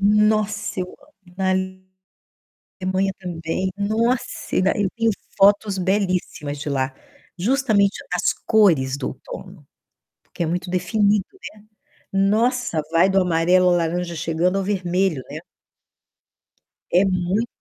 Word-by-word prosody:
Nossa, 210 -1 +2
eu 180 - -2
amo. 185 0 -19
Na 190 -1 +1
Alemanha 185 0 -4 1.1
também. 175 0 -3
Nossa, 225 +5 -1
e - - +3
dá 190 - +3
eu 205 -2 +1
tenho 230 -1 +2 0.3
fotos 200 0 +4
belíssimas 180 -6 -1
de 150 - -5
lá. 130 -1 -1 0.4
Justamente, 215 -2 +2 0.2
as 180 - +2
cores 160 - +4
do 135 -2 -3
outono, 180 +3 -10 0.6
porque - - -6
é - - 0
muito 175 +2 -2
definido, 200 +2 +2
né. 385 - -21 0.8
Nossa, 225 -2 +1
vai 170 +3 +4
do 190 0 +3
amarelo 180 +1 +3
à - - +4
laranja 170 +1 -1
chegando 165 +4 0
ao 195 - 0
vermelho, 185 -6 0
né. - - -5 1.5
É 180 +3 +5
muito 185 +4 0
185 Hz, 125 wpm, -22 LUFS, 175-205 Hz, 1.5 s, É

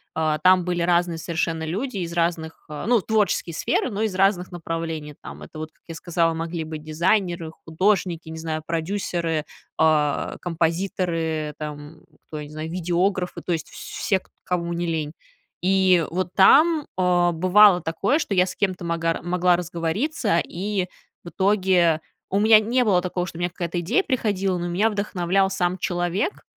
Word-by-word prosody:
э, 155 -1 +1
там 185 -1 +5
были 175 -1 -1
разные 175 -1 +1
совершенно 165 -1 -2
люди 210 +8 -3
из 170 -2 -4
разных, 165 -1 -2
э, 150 -1 -6
ну, 240 -1 +4
творческие 210 -4 0
сферы, 240 - 0
но 205 +1 -3
из 215 -4 -1
разных 190 -1 +2
направлений. 165 -3 -4
Там - - -10
это 155 - -10
вот, 155 0 -6
как - - -39
я 165 - -6
сказала, 165 -1 0
могли 165 0 -4
быть 155 -1 -7
дизайнеры, 170 +1 0
художники, 175 -1 0
не 160 0 -7
знаю, 160 -1 -4
продюсеры, 165 -2 -2 0.3
э, 150 -2 +2
композиторы, 165 -2 -1
там, 150 +1 -8 0.3
кто, 155 - -6
я 150 - -6
не - - -14
знаю, 155 +1 -5
видеографы, 180 +1 -1
то - - -3
есть 160 -2 -2
вс - - -13
все, 195 -3 -1
к - - -28
кому 170 -1 -2
не 170 0 -2
лень. 155 -3 -2 0.5
И 185 -2 +4
вот 185 +1 -3
там, 300 - +5
э, 180 -1 +3
бывало 185 +2 +6
такое, 195 - +1
что 300 - -2
я 180 -1 +3
с - - -6
кем-то 185 -3 -1
магар 165 -1 -1
могла 180 0 +2
разговориться, 180 - -1
и 190 +1 -3 0.4
в - - -6
итоге 185 -4 +2 0.3
у 195 - +1
меня 215 +1 +7
не 240 +4 +1
было 185 -4 +3
такого, 180 0 -3
что 170 - -9
у - - -8
меня 175 0 0
какая-то 175 0 -4
идея 225 - +1
приходила, 200 - 0
но 175 0 -3
меня 200 +6 +2
вдохновлял 195 -2 0
сам 185 -1 -1
человек. 175 - -2
175 Hz, 175 wpm, -23 LUFS, 165-190 Hz, 0.5 s, меня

